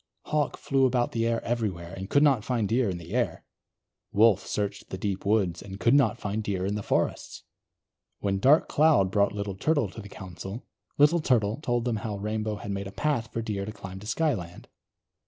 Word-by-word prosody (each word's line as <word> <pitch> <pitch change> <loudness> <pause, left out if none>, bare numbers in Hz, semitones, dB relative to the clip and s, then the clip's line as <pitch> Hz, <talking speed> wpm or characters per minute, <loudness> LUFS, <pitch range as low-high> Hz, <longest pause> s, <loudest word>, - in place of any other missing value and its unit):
Hawk 150 -1 0
flew 135 -1 +2
about 120 -1 0
the 115 0 0
air 115 0 0
everywhere, 100 -7 -2
and 95 0 -7
could 145 - +4
not 135 -8 +4
find 115 -3 0
Deer 115 +1 +2
in 90 - -3
the 85 +3 -9
air. 125 -1 -1 0.7
Wolf 105 -2 +4
searched 100 -1 -3
the 95 - -5
deep 100 0 -3
woods, 95 -5 +1
and 100 -1 -9
could 115 +2 +3
not 140 -4 +4
find 105 -1 -3
Deer 95 -3 -2
in 100 - -1
the 105 - -2
forests. - - -1 0.7
When 100 -1 -1
Dark 140 +9 +5
Cloud 145 -12 +4
brought 100 0 +3
Little 100 -1 -3
Turtle 145 +2 +1
to 110 - -9
the 100 - -11
Council, 95 +5 -8 0.3
Little 150 +4 +5
Turtle 110 -7 +2
told 120 -5 0
them 120 -3 0
how 105 -1 -4
Rainbow 105 +1 -2
had 100 0 -6
made 100 0 -3
a - - -8
path 115 -1 -1
for 115 - -3
Deer 105 -3 -3
to 105 - -5
climb 95 -2 -9
to 105 - -10
Skyland. 110 - -2
105 Hz, 205 wpm, -27 LUFS, 100-120 Hz, 0.7 s, Dark